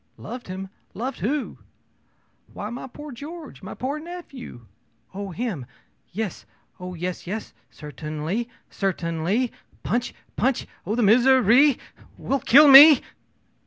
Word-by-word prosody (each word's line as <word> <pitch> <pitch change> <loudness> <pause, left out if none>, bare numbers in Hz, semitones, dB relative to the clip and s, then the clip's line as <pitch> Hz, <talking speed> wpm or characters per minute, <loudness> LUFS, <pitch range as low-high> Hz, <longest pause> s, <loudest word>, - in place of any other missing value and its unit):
ō'Loved 245 0 -8
him! 190 +1 -6 0.3
Loved 255 +6 -4
who?' 275 +7 -2 1.0
ō'Why, 210 +2 -5
my 245 - -7
poor 295 +4 -10
George! 300 +5 -10
my 190 - -8
poor 275 +4 -3
nephew!' 305 - -10 0.5
ō'Oh 200 +1 -5
him! 180 - -4 0.4
Yes 210 -1 -4 0.4
oh, 180 0 -7
yes, 180 +1 -5
yes. 210 +4 -5 0.2
Certainly 155 - -5 0.2
certainly. 190 +5 -1 0.3
Punch 240 +1 -2 0.2
punch 260 0 0 0.2
oh, 215 - -1
this 240 -2 +2
misery 255 +3 +5 0.4
will 275 - -1
kill 285 +5 +7
me!' 285 +1 +10
230 Hz, 120 wpm, -24 LUFS, 185-270 Hz, 1.0 s, me